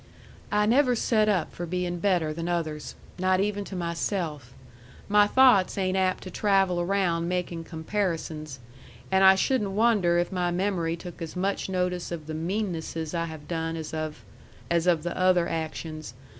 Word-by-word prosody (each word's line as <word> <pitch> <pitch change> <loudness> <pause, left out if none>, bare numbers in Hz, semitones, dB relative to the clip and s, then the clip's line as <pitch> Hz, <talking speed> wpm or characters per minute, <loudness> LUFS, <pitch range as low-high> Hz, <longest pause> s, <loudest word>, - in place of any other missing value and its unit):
"I 210 0 +3
never 250 +3 +4
set 215 -2 +2
up 185 -6 0
for 175 - -5
being 175 0 -2
better 175 -5 +1
than 165 +2 -4
others. 155 -4 -3 0.2
Not 185 0 +2
even 205 +1 0
to 195 - -7
myself. 170 - -3 0.5
My 205 0 +5
thoughts 245 -7 +5
ain't 190 -1 0
apt 185 -1 +1
to 185 - -8
travel 195 -3 +2
around 175 -2 0
making 175 -2 -3
comparisons. 160 -4 -3 0.5
And 190 0 +4
I 190 0 +8
shouldn't 210 +1 +1
wonder 205 -5 +3
if 175 0 0
my 180 -2 0
memory 175 -2 0
took 175 +1 -10
as 165 +1 -6
much 195 +2 -1
notice 180 -2 -1
of 165 -3 -5
the 155 - -6
meannesses 165 -2 -3
I 170 -1 0
have 160 -2 -9
done 165 -1 -2
as 160 0 -6
of 155 -7 -5 0.5
as 170 0 +2
of 165 -3 +3
the 175 - -3
other 185 -2 +3
actions. 155 -4 -5
175 Hz, 170 wpm, -27 LUFS, 165-195 Hz, 0.5 s, I